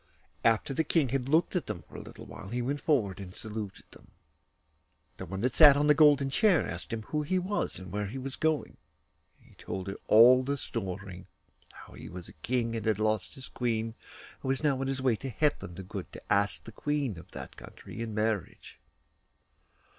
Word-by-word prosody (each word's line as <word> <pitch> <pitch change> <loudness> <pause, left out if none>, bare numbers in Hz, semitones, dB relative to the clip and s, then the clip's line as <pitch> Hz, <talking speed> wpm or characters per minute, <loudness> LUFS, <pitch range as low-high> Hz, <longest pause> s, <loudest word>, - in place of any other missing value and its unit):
After 115 +4 +2
the 160 - +1
King 155 -3 +2
had 135 0 -1
looked 160 +5 +3
at 180 - -1
them 85 - -5
for - - -17
a - - -6
little - - -11 0.2
he 120 +3 -2
went 140 +4 -2
forward 110 - +1
and 95 -2 -8
saluted 105 -2 -6
them. - - -16 1.1
The 95 - -7
one 95 +3 -4
that 125 +1 +1
sat 145 -3 +8
on 145 - +2
the 150 - +6
golden 145 -2 +5
chair 195 - +3
asked - - -6
him 115 -1 -3
who 150 +6 -2
he 170 +5 0
was 185 +3 -1
and 95 -1 -9
where 105 0 -2
he 120 +7 -6
was 130 0 -5
going; 155 -1 -1 0.6
and - - -23
he - - -20
told 95 -1 -4
her 95 0 -5
all 120 +4 +8
the 140 +2 -2
story 95 -6 -6 0.4
how - - -14
he - - -9
was 90 0 -8
a - - -12
king, 115 +7 -1
and 110 -1 -3
had 110 -3 +2
lost 110 -2 0
his 130 - -10
queen, 115 -2 -2 0.5
and 130 - -3
was 135 +3 0
now 140 -3 +2
on 135 - -1
his 135 -1 -2
way 125 -4 +3
to 135 - -5
Hetland 135 - -1
the 95 - -7
Good, 90 - -7
to - - -2
ask 100 0 +1
the 115 - -10
Queen 140 - -2
of - - -14
that - - -9
country - - -10
in 110 -2 -4
marriage. 105 -3 -2
120 Hz, 210 wpm, -30 LUFS, 105-140 Hz, 1.1 s, sat